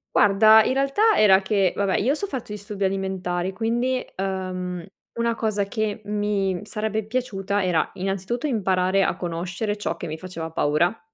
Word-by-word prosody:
Guarda, 215 +2 +6
in 260 - +1
realtà 275 +12 +3
era 195 -2 +6
che 195 -2 +2
vabbè, 200 -1 +1
io 250 +7 +2
ho - - +3
sofferto 270 - -5
disturbi 205 -1 -5
alimentari, 190 -1 -1
quindi, 240 +4 0
uhm, 185 -2 -3 0.3
una 235 0 0
cosa 210 -3 -1
che 215 +1 -3
mi 205 -3 -1
sarebbe 215 0 -3
piaciuta 205 -5 -2
era 170 -4 +1
innanzitutto 195 +8 -2
imparare 190 -4 +1
a - - 0
conoscere 180 +5 -3
ciò 205 - -3
che - - -6
mi 155 +1 -5
faceva 165 -2 -6
paura. 165 +6 +1
200 Hz, 155 wpm, -24 LUFS, 185-220 Hz, 0.3 s, Guarda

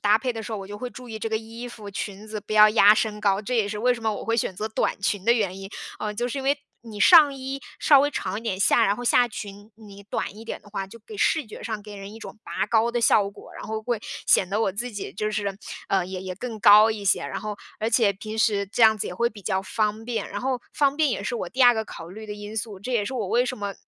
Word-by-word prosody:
搭 210 +1 +4
配 250 +2 -2
的 225 - -6
时 220 +1 -7
候， 210 - -3
我 195 - -7
就 205 +1 -8
会 250 - -4
注 250 -2 -11
意 220 -1 -6
这 225 - -3
个 220 - 0
衣 230 +2 -7
服、 210 -4 -9
裙 200 +1 -6
子 215 -1 -5
不 215 - -8
要 215 0 +8
压 210 -1 +7
身 210 -1 -1
高， 200 -1 +2
这 245 +3 -2
也 215 -3 +2
是 210 0 -4
为 250 +1 +3
什 235 - -6
么 220 -1 0
我 - - -6
会 230 0 0
选 195 - -1
择 215 +4 -4
短 220 - -1
裙 200 0 -1
的 235 - +5
原 195 -5 -1
因。 195 0 -8 0.3
呃， 210 0 -3
就 240 +3 -2
是 275 - -4
因 270 - -5
为， 280 +2 +3 0.3
你 215 -2 -9
上 305 - +8
衣 270 0 -5 0.2
稍 285 -3 +6
微 290 +1 +2
长 200 -7 -3
一 - - -14
点， 190 -5 -2
下 200 - +4
然 200 - +2
后 245 - -6
下 245 +1 +4
裙， 205 -1 -9
你 200 -2 -13
短 205 0 -4
一 225 - -10
点 230 - -6
的 205 - -18
话， 195 -1 -4
就 230 +4 -13
给 425 - -9
视 320 - +1
觉 215 - -10
上 220 -2 -4
给 210 0 -10
人 195 +1 -9
一 225 - -10
种 225 - -10
拔 - - -2
高 230 +1 +2
的 240 - -1
效 205 -3 +4
果， - - -14
然 - - -8
后 220 0 -4
会， 235 -1 -2 0.3
显 185 - +4
得 210 +3 0
我 210 - +2
自 240 +5 -4
己 205 - -6
就 215 +2 -2
是， 200 -2 -2 0.3
呃， 190 -2 +2
也 185 0 -6
也 185 -1 -5
更 225 +2 -6
高 210 +2 +8
一 210 -2 -5
些， 195 - +2
然 - - -4
后 210 -1 -5 0.2
而 220 - 0
且 225 -3 +3
平 215 +3 -7
时 205 -2 +2
这 225 +4 -1
样 220 -1 +7
子 - - -2
也 - - -5
会 235 +5 +1
比 210 - -12
较 190 -1 -1
方 215 +2 -1
便。 240 -1 -3
然 - - -5
后 255 -1 -1
方 285 -1 +2
便 310 -2 +3
也 - - -2
是 - - -3
我 - - -4
第 260 +1 +1
二 245 0 +8
个 220 0 -2
考 165 -4 -9
虑 215 +4 -9
的 210 - -5
因 210 +1 -8
素， 210 -2 -4
这 250 - -6
也 215 -4 +1
是 265 - -5
我 215 -7 -2
为 245 +2 +2
什 255 - -3
么， 200 -2 -4
215 Hz, 320 characters per minute, -25 LUFS, 205-235 Hz, 0.3 s, 要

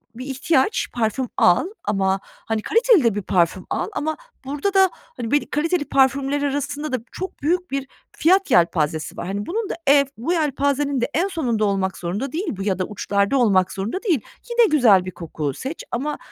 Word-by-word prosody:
bir 255 +2 -7
ihtiyaç, 270 - +1
parfüm 240 +2 -1
al 175 - +4 0.2
ama, 195 -1 +1
hani, 225 -1 -5
kaliteli 460 - +4
de 230 -4 +2
bir 205 - -1
parfüm 180 -1 +1
al - - -1
ama 315 +1 -2 0.3
burada 290 +9 -2
da, 385 -1 +5
hani, 235 -2 -8
belli 290 - +1
kaliteli 320 +1 0
parfümler 275 +1 +2
arasında 290 +1 -2
da - - +2
çok 375 0 -7
büyük 355 +3 0
bir 275 0 -2 0.2
fiyat 375 0 +2
yelpazesi 160 -4 +1
var. - - -5
Hani, 200 +2 -3
bunun 430 +3 -3
da - - -2
ev, 280 0 +6
bu 260 +10 -1
yelpazenin 285 -3 0
de 240 - 0
en 350 +4 +1
sonunda 245 - -1
olmak 195 -2 -1
zorunda 205 +10 -3
değil 360 +5 -3
bu 195 - -4
ya 195 -2 -1
da 185 - 0
uçlarda 200 +4 0
olmak 190 -6 +3
zorunda 215 - -4
değil. 340 - +1 0.3
Yine 475 0 +4
güzel 225 -11 +5
bir 185 - -5
koku 160 -4 -4
seç 270 - -6
ama, 280 +5 -2
265 Hz, 190 wpm, -22 LUFS, 200-305 Hz, 0.3 s, ev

